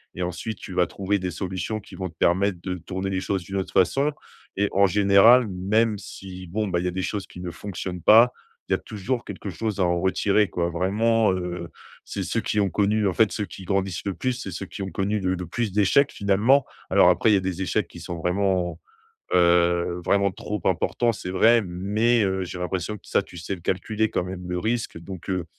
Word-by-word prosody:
et 90 - -5
ensuite 90 +5 -4
tu 95 - -8
vas 90 -1 +3
trouver 100 +1 -1
des 90 -1 -3
solutions 95 +4 -3
qui 105 - -13
vont 95 -2 -4
te 80 - -20
permettre 95 +2 +2
de 90 0 -3
tourner 95 +2 -4
les 95 -1 -1
choses 95 -1 -2
d'une 95 +3 -7
autre 95 - -3
façon 135 - +2 0.5
et 100 0 +2
en 100 +1 +4
général 105 +5 +6
même 105 +4 +1
si, 95 -2 -9
bon, 105 +4 -2
bah, 90 -2 0
il 90 - -3
y - - +1
a - - -1
des 95 +1 -3
choses 100 -2 -3
qui - - -12
ne 90 -1 -5
fonctionnent 90 0 -6
pas, 115 +7 +7 0.3
il - - -9
y - - +5
a - - -1
toujours 115 +4 -3
quelque 100 0 -7
chose 105 +4 -3
à 95 - +3
en 85 0 +1
retirer, 100 +2 +2
quoi. 85 -1 -1
Vraiment, 105 +5 +2
heu, 90 -1 -4 0.4
c'est - - -5
ceux - - -1
qui 105 - -1
ont 100 -2 +2
connu 105 +1 +1
en 95 - 0
fait, 110 -3 +3
ceux 105 - -2
qui 95 - -11
grandissent 95 -1 -1
le 100 - -1
plus, 130 -1 -1
c'est 120 -6 -6
ceux 95 +3 -5
qui - - -8
ont 95 - -5
connu 100 +2 -1
le 95 -1 0
le 90 0 -5
plus 115 +2 -2
d'échecs, 105 +8 +3
finalement. 105 +8 +3 0.3
Alors - - +6
après, 110 - +3
il - - +5
y - - +5
a - - +2
des 95 0 -3
échecs 95 -1 0
qui 85 - -12
sont 85 +1 -6
vraiment, 90 0 0 0.6
heu, 85 0 +3
vraiment 100 0 +2
trop 105 +3 -5
importants, 120 -1 +1
c'est 95 - -6
vrai, 115 +5 +5
mais, 105 +6 +1
heu, 95 -1 0
j'ai 90 0 -7
l'impression 90 +3 -3
que - - -22
ça, - - +2
tu 90 - -13
sais 85 +4 -4
le 85 - -15
calculer, 110 +5 -1
quand - - 0
même, 90 0 -7
le 90 - -1
risque, 115 -4 -2
donc, 95 +2 -9
heu 90 -2 -2
95 Hz, 235 wpm, -24 LUFS, 90-105 Hz, 0.6 s, pas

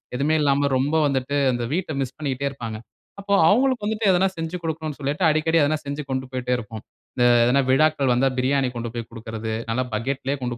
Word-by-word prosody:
எதுவுமே 145 +5 +1
இல்லாம 140 0 +2
ரொம்ப 140 +4 0
வந்துட்டு, 135 0 -1 0.2
அந்த 120 -1 -2
வீட்ட 175 -1 -2
மிஸ் 130 -1 -3
பண்ணிட்டே 140 -2 -2
இருப்பாங்க. 115 -5 -6 0.4
அப்போ 200 0 -2
அவுங்களுக்கு 245 +2 +2
வந்துட்டு 220 +1 -1
எதுனா 185 +1 +3
செஞ்சி 165 +2 -4
கொடுக்கனுன்னு 160 -2 -4
சொல்லிட்டு, 145 +5 -2
அடிக்கடி 160 +2 +2
எதுனா 155 +2 +1
செஞ்சி 145 +1 -4
கொண்டு 130 0 -2
போய்ட்டே 125 -1 -2
இருப்போம். 110 -1 -8 0.3
இந்த 125 -2 +2 0.2
எதுனா 130 +3 +3
விழாக்கள் 145 -1 +3
வந்தா, 130 +2 +2
பிரியாணி 135 0 +1
கொண்டு 115 -1 -4
போய் 115 -1 -5
குடுக்கிறது 110 -1 -6 0.2
நல்லா 130 +3 0
பக்கெட் 130 +5 -2
லே 140 - +1
கொண்டு 120 -1 -3
140 Hz, 195 wpm, -23 LUFS, 125-155 Hz, 0.4 s, எதுனா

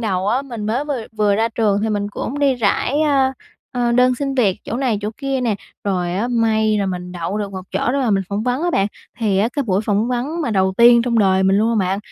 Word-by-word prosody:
đầu 195 -3 -1
á, 255 +5 +1
mình 235 -6 -6
mới 245 +7 -1
vừa 280 -6 -3
vừa 210 -1 +2
ra 225 +2 +1
trường 210 -3 +1
thì 220 - 0
mình 205 -1 -1
cũng 275 +7 -4
đi 275 -2 +3
rải, 245 +5 0
ờ, 275 -3 +2 0.4
ờ, 240 -1 0
đơn 250 +1 +4
xin 275 +1 -3
việc 215 -8 +2
chỗ 235 - -3
này 250 -6 0
chỗ 210 +1 -3
kia 275 -2 -2
nè, 230 -4 0 0.3
rồi 180 -3 -1
á 220 +6 -1
may 220 -2 +2
là 200 - 0
mình 180 -1 -5
đậu 180 +4 -3
được 200 -1 -4
một 190 - -5
chỗ 205 +6 0
để 280 - 0
mà 250 -5 +1
mình 195 -1 +2
phỏng 205 +1 -2
vấn 250 +4 -1
á 350 - +1
bạn. 195 -10 +2 0.3
Thì 205 -5 +1
á 220 +3 +2
cái 285 - -1
buổi 195 -6 0
phỏng 210 +2 0
vấn 255 +7 -2
mà 240 - -1
đầu 190 -2 +2
tiên 235 0 +7
trong 235 -1 +1
đời 190 -2 +3
mình 190 +1 +3
luôn 225 +1 +2
mà 190 - +1
bạn, 190 +2 -1
220 Hz, 265 wpm, -19 LUFS, 200-250 Hz, 0.4 s, tiên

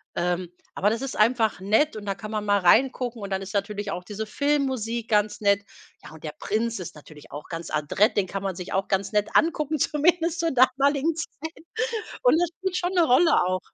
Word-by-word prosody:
Ähm, 175 0 -1 0.2
aber 205 - +2
das 225 +3 -2
ist 270 - -4
einfach 220 -2 +2
nett, 220 +9 +2
und 210 -1 -7
da 195 -1 -2
kann 215 +2 -8
man 215 -1 -2
mal 205 -1 +3
reingucken, 240 +4 +2
und 200 - -5
dann 190 0 -2
ist 195 - -8
natürlich 205 0 -2
auch 180 - -5
diese 215 +3 -5
Filmmusik 255 -3 -1
ganz 210 -1 +1
nett. 200 -1 +3 0.4
Ja, - - -11
und 160 0 -14
der 150 - -5
Prinz 225 0 -1
ist 170 - -7
natürlich 150 0 -14
auch 145 +2 -8
ganz 165 -2 -6
adrett, 155 - +1
den 200 - +3
kann 195 +1 -4
man 190 -2 -2
sich 180 0 -7
auch 195 +1 0
ganz 195 +1 0
nett 210 -1 +1
angucken, 310 -2 +2
zumindest 335 +4 +1
zur 330 -1 +1
damaligen 275 +4 +3
Zeit. 320 0 -7 0.6
Und - - +4
das 350 - +2
spielt 375 -1 -3
schon 355 +1 -1
'ne 350 -2 +5
Rolle 320 +5 +4
auch. 185 +1 0
215 Hz, 215 wpm, -25 LUFS, 195-280 Hz, 0.6 s, ne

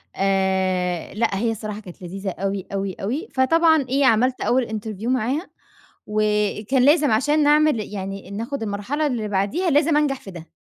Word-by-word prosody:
آآ، 190 -2 0
لأ، 215 -2 0
هي 230 0 +1
الصراحة 215 -1 -5
كانت 185 -3 -13
لذيذة 190 +2 -5
أوي، 195 +1 -3
أوي، 195 -1 -2
أوي، 275 - -4
فطبعًا 320 +2 +3
إيه، 275 +1 +2
عملت 255 +2 +3
أول 250 -1 +1
interview 220 0 -5
معاها 260 - -1 0.6
وكان 210 +3 +1
لازم 295 -2 +4
عشان 295 +7 +2
نعمل 300 -4 +4
يعني 195 0 -6
ناخد 230 +5 -4
المرحلة 220 +9 -2
اللي 230 -5 -2
بعديها 205 - 0
لازم 295 +1 +3
أنجح 285 -3 +1
في 195 - -10
ده. 165 -2 -10
220 Hz, 160 wpm, -22 LUFS, 195-280 Hz, 0.6 s, لازم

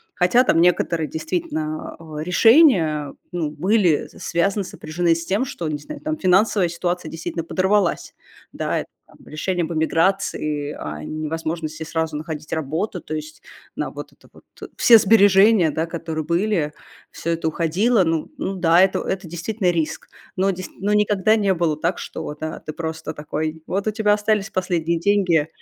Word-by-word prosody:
хотя 195 +8 +4
там 165 -8 +3
некоторые 170 -2 +2
действительно, 155 -1 -3
э, 155 -2 -7
решения, 180 - +4 0.2
ну, 160 -4 -2
были 180 +1 +2
связаны, 195 +4 0
сопряжены 170 -1 -1
с 165 - -5
тем, 200 +8 0
что, 170 -9 -5
не 150 -1 -2
знаю, 300 - -9
там, 310 +1 -2
финансовая 190 - +3
ситуация 175 -1 -3
действительно 165 0 -4
подорвалась, 190 +2 0 0.4
да. - - -2 0.3
Там - - -20
решение 175 +3 -2
об 165 - -4
эмиграции, 160 -3 0
о 75 0 -6
невозможности 155 - -4
сразу 160 -1 -2
находить 155 -1 -7
работу, 160 +5 -2
то 155 - -6
есть 155 0 -7 0.4
на - - -2
вот - - -9
это - - -23
вот - - -18 0.3
Все 235 - +7
сбережения, 200 -3 +5
да, 160 +2 -1
которые 165 -2 -5
были, 170 -2 0 0.4
всё 170 - -5
это 165 -1 -1
уходило. 185 +8 +2
Ну 165 -2 -1
ну 195 - -3
да, 170 0 +4
это 190 0 +3
это 190 0 -3
действительно 180 +2 -1
риск. 160 -3 -3 0.3
Но 195 +1 +2
дейст 185 0 -7
но 200 +2 -1
никогда 210 +1 +3
не 200 -2 +2
было 165 -4 0
так, 170 +3 -1
что, 150 - -6
да, 155 0 -4
ты 155 - -7
просто 160 -1 -5
такой: 155 +1 -4
"Вот 195 +3 -2
у - - +2
тебя 210 -1 +1
остались 210 -1 0
последние 170 -3 -1
деньги, 180 -5 +2
170 Hz, 160 wpm, -21 LUFS, 155-195 Hz, 0.4 s, Все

